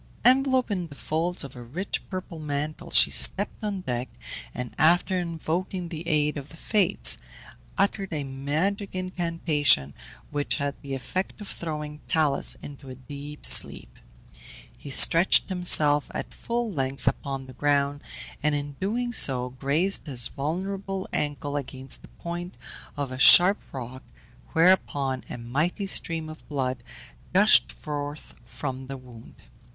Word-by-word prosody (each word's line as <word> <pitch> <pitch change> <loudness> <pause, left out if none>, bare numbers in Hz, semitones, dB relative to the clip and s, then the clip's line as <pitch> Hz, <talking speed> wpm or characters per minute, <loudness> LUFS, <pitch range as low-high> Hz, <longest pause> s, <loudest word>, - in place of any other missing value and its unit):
Enveloped 260 -1 +3
in 180 -4 -2
the 145 - -13
folds 165 +5 -2
of 135 -2 -10
a 125 - -9
rich 155 +12 -4
purple 185 -3 -6
mantle, 155 +3 -4
she - - +6
stepped 200 +2 +3
on 200 -3 -3
deck, 125 -5 -3 0.4
and 125 - -6
after 175 +3 +3
invoking 175 +1 -3
the 165 0 -7
aid 150 -1 +1
of 140 +1 -8
the 165 - -14
Fates, 200 - +4 0.6
uttered 200 -1 0
a 150 -3 -3
magic 155 +10 -2
incantation, 165 - +1 0.4
which 145 -1 -1
had 140 -1 -2
the 140 -1 -5
effect 185 +11 -4
of 205 - -9
throwing 150 -4 -5
Talus 155 -4 +3
into 140 -1 -10
a 130 - -8
deep 145 +3 -6
sleep. - - +4 0.8
He 145 - -11
stretched 165 +9 +5
himself 155 -5 +3
at - - -5
full 235 -1 -3
length 135 -2 -3
upon 135 -2 -2
the 130 - -12
ground, 145 +1 0 0.4
and 150 0 +1
in 145 -1 -5
doing 240 +5 -2
so 125 - +4
grazed 150 +10 0
his 125 -4 +1
vulnerable 190 +6 -4
ankle 145 -1 -2
against 135 -1 -5
the - - -14
point 175 +1 -7 0.4
of 140 -2 -3
a 130 - -6
sharp 180 +8 +8
rock, 130 0 -7 0.5
whereupon 145 -6 +2
a - - -6
mighty 150 - -2
stream 165 -4 +1
of 155 0 -12
blood 130 -4 -2 0.5
gushed - - +5
forth 145 - -7
from 130 +2 -6
the 135 0 -6
wound. 125 -3 -14
150 Hz, 145 wpm, -25 LUFS, 135-180 Hz, 0.8 s, sharp